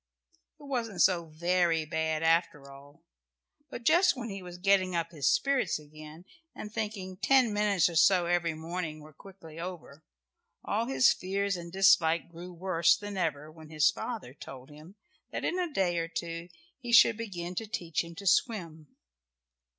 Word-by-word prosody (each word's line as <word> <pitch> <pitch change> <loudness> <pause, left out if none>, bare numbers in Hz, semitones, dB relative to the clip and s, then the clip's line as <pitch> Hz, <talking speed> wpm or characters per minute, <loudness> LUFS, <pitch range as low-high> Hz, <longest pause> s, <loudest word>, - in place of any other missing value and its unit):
It - - -15
wasn't 235 -9 -1
so 170 -3 +2
very 170 0 +1
bad 160 0 -2
after 165 -4 +1
all, 145 +4 -16 0.7
but 240 - -8
just 340 +7 +4
when 240 -3 -6
he 195 0 -6
was 180 -1 -10
getting 185 -1 +2
up 165 0 -2
his 145 -6 +1
spirits 275 - +1
again, 155 +2 -13 0.3
and 210 0 -8
thinking 200 -4 -5
ten 255 -1 +3
minutes 205 -4 +2
or 170 - -5
so 175 +2 +4
every 170 -2 0
morning 160 -1 -5
were 155 +1 -14
quickly 165 -2 -13
over, 165 -4 -8 0.6
all 225 +3 -1
his 260 -1 +4
fears 195 +1 -2
and 170 -1 -8
dislike 170 -3 +3
grew 175 +2 -10
worse 170 -2 +2
than 205 -1 -7
ever 155 -4 -2
when 160 -1 -14
his 155 -2 +3
father 220 - -6
told 135 -1 -11
him 155 +6 -14 0.4
that - - -4
in 365 - -1
a 350 -3 -2
day 180 -8 0
or 165 - -2
two 165 0 -6 0.3
he 240 -2 -6
should 230 -1 +7
begin 180 -6 -6
to 220 +4 -4
teach 170 -6 -2
him 170 0 -11
to 200 +3 -9
swim. 170 -7 0
175 Hz, 170 wpm, -29 LUFS, 160-200 Hz, 0.7 s, should